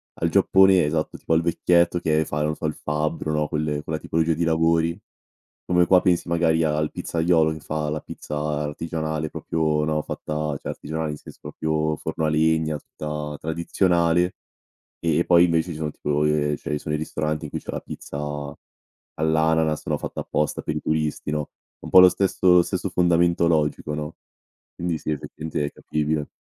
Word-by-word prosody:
al 85 - -1
Giappone, 95 0 +5
esatto, 75 +1 -1
tipo - - -7
al 80 - +4
vecchietto 85 +1 +2
che 80 -1 +1
fa 75 0 -3
non 75 +1 0
so - - -6
il 75 - 0
fabbro, 75 +1 -2
no, 75 -1 0
quel 75 -1 -2
quella 80 0 -3
tipologia 80 0 0
di 85 +2 -1
lavori, 80 +2 +2 0.7
come 90 -1 +3
qua 90 0 +5
pensi 90 -2 +1
magari 85 -1 +2
al 75 0 0
pizzaiolo 80 -1 +1
che 80 - -8
fa 75 0 -3
la 75 - -2
pizza 75 - -7
artigianale 75 +1 -2
proprio, 75 -2 -1
no, 75 0 0
fatta 75 - -6 0.2
cioè - - -7
artigianale, 80 0 -4
in 75 - -6
senso - - -13
proprio 80 0 -1
forno 80 0 -3
a - - +2
legna, 80 0 +2
tutta 75 -1 -6
tradizionale, 85 +1 +1 0.7
ehm, 80 -2 +1
e - - +2
poi 85 -1 +6
invece 85 0 +1
ci - - -7
sono 75 -1 -2
tipo 75 0 -1
ehm, 75 -1 +1
cioè - - -6
ci - - -1
sono 75 +1 -4
i 75 - 0
ristoranti 75 0 -2
in - - -10
cui - - -4
c'è - - -7
la - - -3
pizza 70 - -8 1.0
all'ananas, 80 0 +1
no, - - 0
fatta - - -5
apposta 75 -1 -1
per 75 - -3
i - - -1
turisti, 75 -1 -1
no. 75 -1 -2 0.3
Un - - -8
po' 95 - +9
lo 90 - +9
stesso 95 -1 -1
lo 90 - +7
stesso - - -3
fondamento 85 -1 +3
logico, 75 -2 0
no. 75 +1 -5 0.6
Quindi 85 -2 -2
sì, 75 - -3
effettivamente 75 +1 -4
è 75 - -4
capibile. 75 0 -2
80 Hz, 185 wpm, -24 LUFS, 75-85 Hz, 1.0 s, po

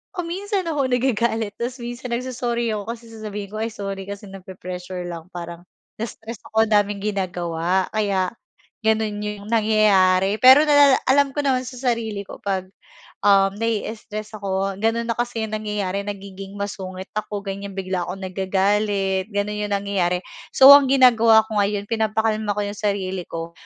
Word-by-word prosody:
kung 355 -3 -3
minsan 400 +1 -2
ako 280 -5 0
nagagalit, 230 -4 0
tapos 245 +2 -4
minsan 240 +1 -6
nag-so-sorry 240 -1 -2
ako 205 - -4
kasi 235 0 -10
sasabihin 210 -2 -6
ko, 215 - -5
"Ay 225 - -3
sorry, 195 -2 -5
kasi 200 0 -7
nape-pressure 185 -1 -7
lang 170 +1 -8
parang 170 0 -8 0.4
na-stress 225 0 -7
ako 220 0 +3
ang - - -10
daming 205 -1 +2
ginagawa 180 -2 -1
kaya 200 -4 0 0.5
gano'n 220 -1 +1
'yong 210 -1 -5
nangyayari." 210 -3 +3
Pero 260 +4 +8
nalala 285 -2 +6
alam 275 +1 +4
ko - - -1
naman 260 -2 +1
sa - - -8
sarili 230 -5 -1
ko - - -10
'pag 190 -2 -2 0.6
um 195 -1 +5
nai-stress 215 -1 -4
ako 195 -1 -2
ganun 225 +2 0
na 230 - 0
kasi 240 -2 -2
yung 215 0 -3
nangyayari 205 -2 -2
nagiging 195 -1 -8
masungit 190 -2 -5
ako 210 -1 -3
ganyan 200 0 -6
bigla 185 -2 -2
akong 190 +2 -6
nagagalit 195 +1 0
gano'n 205 +1 -2
'yong 205 - -2
nangyayari. 195 -3 0 0.4
So 270 +1 +10
ang 285 -2 +5
ginagawa 230 -4 +6
ko 215 -1 -1
ngayon 205 0 0
pinapakalma 220 -1 0
ko 210 - -1
'yong 205 0 -5
sarili 190 -3 -2
ko, 165 0 -6
210 Hz, 160 wpm, -22 LUFS, 195-230 Hz, 0.6 s, So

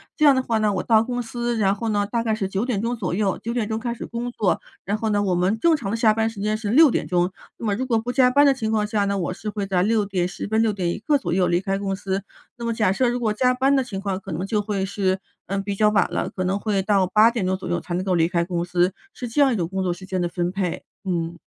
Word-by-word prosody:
这 305 - -1
样 285 - +8
的 260 - +2
话 230 -3 0
呢， 210 -1 +2
我 185 - -1
到 220 -1 +4
公 245 0 -3
司， 240 0 -3
然 200 -2 +2
后 225 +2 -3
呢， 205 -1 +1
大 235 -1 0
概 225 -1 0
是 205 -3 -1
9 195 +2 -2
点 220 -6 -1
钟 235 +2 -1
左 195 -7 -3
右 195 0 0
9 235 +1 -2
点 230 -4 -1
钟 220 - -2
开 235 +1 -3
始 - - -7
工 240 +1 -4
作。 205 -6 0 0.2
然 205 +2 0
后 220 0 -1
呢， 205 -1 +2
我 185 -3 +1
们 185 +5 +1
正 335 +3 +4
常 225 -10 -4
的 230 - -1
下 225 -2 +4
班 220 +1 +1
时 225 -3 -10
间 215 +1 0
是 215 -1 -4
6 290 +6 +7
点 - - -1
钟。 180 0 +1 0.3
那 230 - -6
么 205 - +1
如 255 +5 -2
果 230 -3 +1
不 245 +2 -4
加 250 -1 +4
班 285 +2 +5
的 275 - +5
情 220 -4 -3
况 210 -1 +1
下 210 -1 0
呢， 200 0 0
我 180 0 -2
是 210 +3 -6
会 205 -2 -3
在 185 -2 +1
6 215 -1 +2
点 185 -3 -1
10 180 - -5
分、 220 +2 +2
6 225 -1 +2
点 185 -4 -2
一 175 - -3
刻 290 +6 +2
左 260 - -3
右 185 -1 +2
离 175 0 +2
开 195 +1 -1
公 195 -1 -2
司， 195 0 -3 0.3
那 235 - -7
么 235 0 0
假 215 -4 +2
设 250 +2 +2
如 245 - -1
果 220 -3 0
加 250 +3 +2
班 265 +2 +2
的 265 - +2
情 200 -6 -6
况， 195 -2 -2
可 195 -2 -9
能 175 +5 -3
就 210 0 +1
会 200 -2 -2
是， 190 -1 0 0.3
嗯， 195 0 -1
比 200 0 -3
较 210 +1 +4
晚 210 -1 +2
了， - - -1
可 185 - -4
能 190 +2 0
会 205 -3 0
到 195 -1 +2
8 215 +4 +5
点 225 -6 -2
钟 185 +1 +1
左 190 - -7
右 175 - 0
才 175 - -6
能 185 - -1
够 185 -2 +1
离 165 -1 +3
开 170 -1 0
公 175 -1 -2
司， 180 +1 +1 0.2
是 245 - -6
这 235 +6 +1
样 275 -2 +5
一 - - 0
种 170 -4 -1
工 190 +1 -3
作 180 - 0
时 185 +2 -11
间 185 -1 -2
的 175 - 0
分 175 0 -2
配， 185 -3 -3 0.2
嗯。 170 -3 -2
205 Hz, 325 characters per minute, -23 LUFS, 190-230 Hz, 0.3 s, 样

